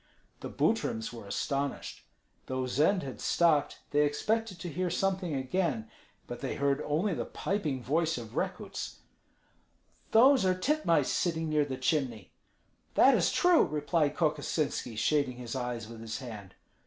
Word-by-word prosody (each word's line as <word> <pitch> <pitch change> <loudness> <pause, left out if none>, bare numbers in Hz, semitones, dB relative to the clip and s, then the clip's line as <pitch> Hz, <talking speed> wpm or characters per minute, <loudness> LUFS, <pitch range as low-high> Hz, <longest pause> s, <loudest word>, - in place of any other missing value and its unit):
The - - -6
Butryms 110 +1 0
were 115 -4 -9
astonished. 140 +6 -3 0.4
Though 130 0 -2
Zend 155 +9 +2
had 135 -2 -7
stopped, 155 -4 +2
they 145 0 +4
expected 210 +7 0
to 175 - -4
hear 180 +3 -2
something 185 -2 -1
again; 130 -4 -1 0.3
but - - -7
they - - -3
heard 140 0 +1
only 165 +7 +1
the - - -2
piping 155 -11 -2
voice 160 +4 +1
of 115 -2 -8
Rekuts, - - -4 1.1
"Those 255 +3 +6
are 185 -1 +3
titmice 185 - +2
sitting 165 -2 0
near 150 -1 +2
the 130 -2 -4
chimney!" 130 -4 -1 0.6
"That - - +7
is - - +2
true!" 355 -2 +5
replied 150 0 0
Kokosinski, 150 -6 -1
shading 135 +1 +1
his 125 0 -6
eyes 120 -3 -3
with 115 0 -10
his 115 -1 -4
hand. 105 -7 -9
145 Hz, 145 wpm, -30 LUFS, 130-175 Hz, 1.1 s, That